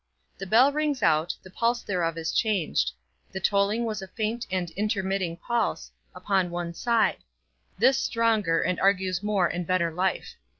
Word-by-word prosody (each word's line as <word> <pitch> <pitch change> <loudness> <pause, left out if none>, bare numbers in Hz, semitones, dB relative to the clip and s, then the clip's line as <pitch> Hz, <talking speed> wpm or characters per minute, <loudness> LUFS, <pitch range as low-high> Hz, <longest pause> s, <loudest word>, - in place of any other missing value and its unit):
The 195 - -5
bell 245 +8 +5
rings 295 -5 -1
out, 160 0 +2
the 185 - -13
pulse 235 +4 0
thereof 170 -4 -1
is 160 -1 -2
changed; 160 - 0 0.4
the 190 - -4
tolling 200 +4 +1
was 215 -3 -3
a 190 - -7
faint 225 +4 -3
and 180 -2 -2
intermitting 190 -3 -1
pulse, 235 +4 -2 0.2
upon 190 -3 0
one 175 0 -4
side; 235 +4 +1 0.6
this 265 0 +4
stronger, 220 -10 +1
and 180 +1 -1
argues 190 -2 +1
more 205 -3 +1
and 175 0 -3
better 185 -2 +1
life. 185 +3 -1
195 Hz, 160 wpm, -26 LUFS, 175-220 Hz, 0.6 s, bell